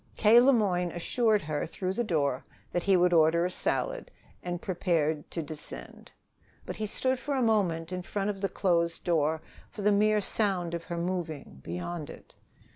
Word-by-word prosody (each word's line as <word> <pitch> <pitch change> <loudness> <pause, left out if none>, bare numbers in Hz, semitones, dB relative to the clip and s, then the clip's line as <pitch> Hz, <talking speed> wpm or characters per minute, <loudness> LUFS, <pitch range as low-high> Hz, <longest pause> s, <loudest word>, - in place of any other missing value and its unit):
K. 225 +2 +7
Le 260 +3 +6
Moyne 185 -7 +1
assured 215 +4 +1
her 150 -1 -2
through 185 +3 -3
the 240 - 0
door 145 - 0 0.3
that 175 - 0
he 195 +1 +4
would 175 0 +3
order 165 +1 +4
a 180 - -1
salad, - - -2 0.3
and 175 -1 -4
prepared 165 -5 -1
to 165 - -4
descend. 150 0 -9 0.5
But - - -6
he 215 - -2
stood 260 +4 0
for 285 +2 -2
a 265 - +1
moment 180 -7 +1
in 180 0 -3
front 200 +3 -2
of 195 -1 -9
the 195 - 0
closed 170 -3 0
door, 160 -2 +1 0.3
for 205 - -7
the 210 - +4
mere 210 +1 +3
sound 190 -4 0
of 170 -1 -4
her 170 - -4
moving, 170 - -4
beyond 145 - -5
it. - - -12
180 Hz, 185 wpm, -29 LUFS, 165-210 Hz, 0.5 s, K